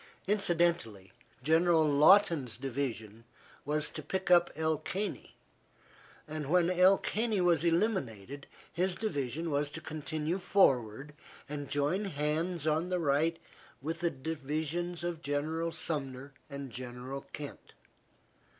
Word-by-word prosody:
Incidentally, 170 - +1 0.3
General 160 +2 +4
Lawton's 150 - +5
division 115 -5 -4 0.4
was 150 +1 0
to 155 - -5
pick 185 +5 -2
up 175 -1 +6
El 160 -1 0
Caney, 190 +7 -4 0.9
and 155 -2 -5
when 180 +1 +4
El 185 +2 +6
Caney 220 -2 -1
was 175 -3 +3
eliminated, 145 - -1 0.3
his 180 +1 0
division 160 - -2
was 145 0 +1
to 160 - -6
continue 155 +3 -3
forward 135 - +2 0.3
and 145 -1 -5
join 145 +8 0
hands 155 0 -1
on 160 +3 +1
the 180 - +1
right 160 +1 +2 0.4
with 160 +5 -4
the 170 - +1
divisions 160 +4 -3
of 175 -2 -3
General 160 +3 -1
Sumner 135 -4 -4 0.2
and 140 -2 -7
General 125 +2 -6
Kent. 145 -1 -8
155 Hz, 120 wpm, -31 LUFS, 140-175 Hz, 0.9 s, up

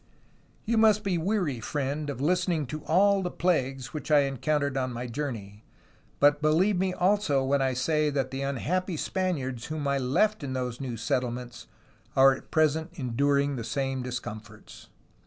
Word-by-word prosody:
"You 230 0 +2
must 215 -1 +4
be 185 -4 0
weary, 175 - -1
friend, 145 +4 -3
of 135 -3 -5
listening 170 +1 +1
to 150 +4 -6
all 195 +4 +4
the 180 - -2
plagues 135 -8 -1
which 155 - -6
I 150 -2 +6
encountered 140 +1 -1
on 130 -1 -1
my 120 +1 -5
journey, 115 -6 -5 0.6
but 145 +1 +4
believe 175 +6 +3
me 190 0 +1
also 180 -7 +2
when 135 +1 +1
I 130 -1 +1
say 150 +3 +1
that 135 -2 -1
the 135 0 -4
unhappy 165 +7 -1
Spaniards 140 -11 -2
whom 155 -2 -3
I 140 0 +1
left 165 +10 +1
in 135 -2 -4
those 125 -1 -3
new 125 -4 -4
settle 125 +3 0
ments 120 0 -8 0.5
are 135 0 +7
at 130 - -10
present 155 +1 +2
enduring 140 0 +1
the 115 - -4
same 135 +2 -2
discomforts. 110 -4 -8
140 Hz, 170 wpm, -27 LUFS, 130-165 Hz, 0.6 s, are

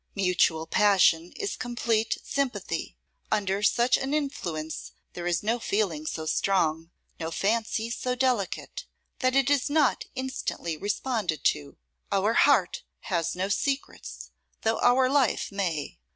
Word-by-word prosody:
Mutual 180 -4 +2
passion 180 -3 +4
is 405 - -3
complete 235 -2 -1
sympathy. 275 -3 -3 0.3
Under 200 -2 0
such 240 +4 +3
an 270 +2 -1
influence 175 - -4 0.2
there 175 0 -4
is 175 0 0
no 230 +3 0
feeling 190 -9 -1
so 160 0 -3
strong, 165 -2 +1 0.3
no 160 -1 -3
fancy 220 +5 -1
so 250 +1 -2
delicate, 255 - -1 0.3
that 255 -2 +1
it 275 0 +3
is 285 -2 +2
not 295 -2 +2
instantly 260 -10 -3
responded 205 - -2
to. 70 -1 0 0.3
Our 200 +3 +2
heart 245 -9 +4 0.3
has 170 -1 0
no 185 +2 -1
secrets, 275 +7 -3 0.3
though 225 0 +1
our 255 +1 +4
life 270 -6 +1
may. 175 - -3
210 Hz, 130 wpm, -27 LUFS, 175-255 Hz, 0.3 s, passion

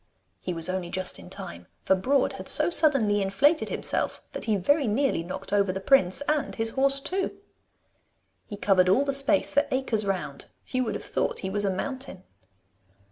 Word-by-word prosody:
He 185 - -5
was 165 -2 -1
only 185 -1 -3
just 185 +1 -3
in - - -12
time, 85 - -8 0.2
for 190 - +3
Broad 260 +8 +1
had - - -9
so - - +6
suddenly 245 -12 +3
inflated 270 - +2
himself - - -2
that - - -6
he 220 -2 +1
very 285 - +1
nearly 250 -3 0
knocked 190 +3 -7
over 200 -2 +2
the 190 - -4
prince 195 -2 +3
and 295 0 -1
his 225 0 0
horse 275 +1 +2
too. 370 +7 -3 1.1
He 205 - -8
covered 185 -3 +3
all 255 +9 +3
the 275 - -1
space 275 +2 +2
for 285 +1 +2
acres 260 -5 0
round. 185 -8 -4 0.2
You 255 -1 -2
would 220 - -3
have - - -5
thought - - -2
he 190 - -3
was 205 +1 0
a - - +1
mountain! 255 0 -5
210 Hz, 190 wpm, -26 LUFS, 190-275 Hz, 1.1 s, so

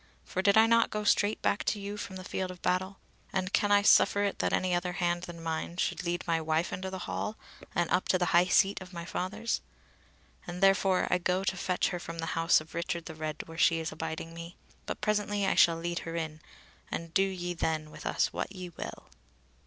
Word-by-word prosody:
For 185 - -2
did 200 +2 +4
I 220 - +8
not 230 0 +4
go 210 0 -3
straight 205 0 +2
back 200 - +1
to 210 - 0
you 200 +1 -5
from 200 -2 -6
the 185 - -7
field 185 0 -3
of 180 -1 -10
battle; 185 +2 0 0.3
and 190 0 -2
can 205 - +2
I 205 0 +5
suffer 205 0 +5
it 200 - -1
that - - +1
any 185 -1 +1
other 175 0 0
hand 175 -1 0
than 175 -1 -9
mine 165 +1 -3
should 185 - -1
lead 175 0 -1
my 165 -1 +1
wife 160 +2 0
into 190 +1 -3
the 190 - -5
hall 215 - -3 0.4
and 175 - +2
up 180 - +2
to 185 - +3
the 180 - +1
high 175 +1 +6
seat 195 +1 +3
of 185 0 -10
my 170 -1 -6
fathers; 210 +6 -2 0.9
and 175 0 -5
therefore 195 -1 +4
I 180 - +3
go 180 +2 0
to 190 - 0
fetch 180 0 0
her 180 - -3
from 165 -1 -7
the 165 - -2
house 165 +1 +4
of 155 +1 -13
Richard 170 0 -3
the 160 - -7
Red 155 -1 -4
where 165 0 -9
she 165 - +5
is 160 0 -3
abiding 160 +1 -5
me; 170 +1 -9 0.3
but - - -4
presently 205 -1 0
I - - +3
shall 165 -1 +5
lead 170 +1 -2
her 165 0 -6
in, 160 -2 -4 0.5
and 165 0 -4
do 190 - +4
ye 180 -2 -1
then 155 -2 -2
with - - -7
us - - +1
what 195 - -4
ye 180 -1 -6
will." 170 - -8
180 Hz, 230 wpm, -30 LUFS, 165-195 Hz, 0.9 s, I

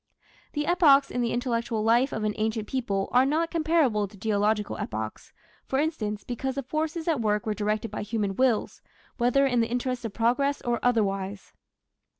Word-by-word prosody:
The 295 -1 -1
epochs 295 -6 +5
in 245 - -1
the 235 - 0
intellectual 235 -3 -1
life 240 +5 +3
of 220 - -3
an 210 0 0
ancient 220 0 -1
people 200 -7 -1
are 250 +1 +5
not 315 +5 0
comparable 310 - +2
to 200 +1 -16
geological 210 - 0
epochs, 110 0 -5 0.4
for 265 - 0
instance, 235 -9 -1
because 255 +2 -3
the 275 - -3
forces 315 +4 -3
at 310 -7 +1
work 210 -1 0
were 215 - 0
directed 215 +1 -2
by - - -4
human 205 -2 -2
wills, 255 -2 +1 0.4
whether 250 +3 +3
in 245 -3 +2
the 230 -1 +1
interests 250 +1 -2
of 225 - -4
progress 250 +6 +1
or 240 -1 0
otherwise. 200 -4 -1
235 Hz, 175 wpm, -27 LUFS, 210-270 Hz, 0.4 s, epochs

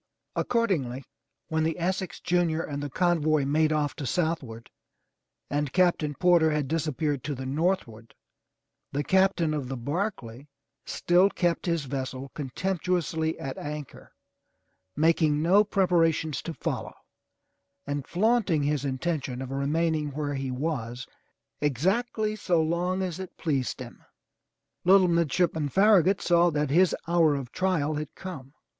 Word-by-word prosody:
Accordingly, 155 - 0 0.5
when 160 0 0
the 160 +1 -1
Essex 185 0 -2
Junior 170 -2 +1
and 145 -1 -5
the 145 - -4
convoy 155 -2 +2
made 155 +2 +2
off 150 -2 0
to 140 - -4
southward, 145 -10 -2 0.8
and 145 -1 -1
Captain 170 -5 +2
Porter 175 0 +4
had 150 -2 -1
disappeared 155 -2 -1
to 145 - -3
the 130 +1 -6
north 170 +8 +1
ward, 115 -1 -15 0.8
the 145 +1 -1
Captain 190 -4 +2
of 145 -4 -3
the 135 0 -4
Barclay 140 - -4 0.4
still 180 +3 +3
kept 175 -2 -1
his 170 -4 0
vessel 135 0 -5
contemptu 180 +6 -1
ously 160 -1 -2
at 135 -1 -6
anchor, 150 -1 -7 0.8
making 155 -1 +3
no 195 +5 +5
preparations 165 -6 +1
to 165 - -5
follow, - - -4 0.9
and 145 -1 -4
flaunting 195 -5 +2
his 145 -1 0
intention 135 -1 -2
of 130 0 -6
remaining 155 +3 0
where 145 0 -2
he 135 -1 -3
was 125 -3 -3 0.6
exactly 205 - 0
so 180 -5 +1
long 175 +4 0
as 180 -1 -4
it 190 -1 -8
pleased 135 - -1
him. - - -10 0.8
Little 190 +1 +6
Midshipman 170 -2 +1
Farragut 195 +1 +4
saw 175 0 +4
that 150 -3 -1
his 180 +4 +4
hour 165 -3 +3
of 130 -3 -5
trial 180 -6 0
had 150 -1 -6
come. 145 -7 -9
160 Hz, 140 wpm, -27 LUFS, 140-180 Hz, 0.9 s, Little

